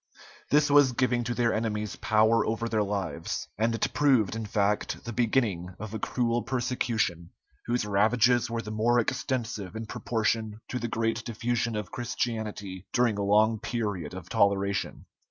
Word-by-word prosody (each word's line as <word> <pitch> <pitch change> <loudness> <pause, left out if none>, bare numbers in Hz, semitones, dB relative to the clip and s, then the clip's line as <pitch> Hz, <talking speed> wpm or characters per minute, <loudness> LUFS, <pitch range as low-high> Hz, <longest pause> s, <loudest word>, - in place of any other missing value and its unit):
This 150 0 +4
was 145 -3 +6
giving 125 -1 +1
to 120 0 -2
their 120 -1 +2
enemies 105 -1 -2
power 110 +1 +3
over 115 +1 -1
their 110 -2 +1
lives, 100 -5 -3
and 115 +1 +2
it - - -1
proved, 130 -9 +3
in 110 -1 -4
fact, 105 0 0
the 115 - -5
beginning 105 -7 0
of 110 +1 -7
a 110 - -3
cruel 120 +1 0
persecution, 115 -9 -1 0.4
whose 120 -2 0
ravages 115 +4 +3
were 115 0 -3
the 105 - -6
more 115 +3 +2
extensive 115 -4 -2
in 110 0 -4
proportion 110 -1 -1
to 125 - -2
the 120 - -2
great 115 0 -1
diffusion 115 0 -1
of 105 -3 -4
Christianity 110 -6 -4
during 120 -4 +2
a - - 0
long 105 +2 +3
period 105 -8 -3
of - - -8
toleration. 100 0 0
110 Hz, 160 wpm, -28 LUFS, 105-120 Hz, 0.4 s, was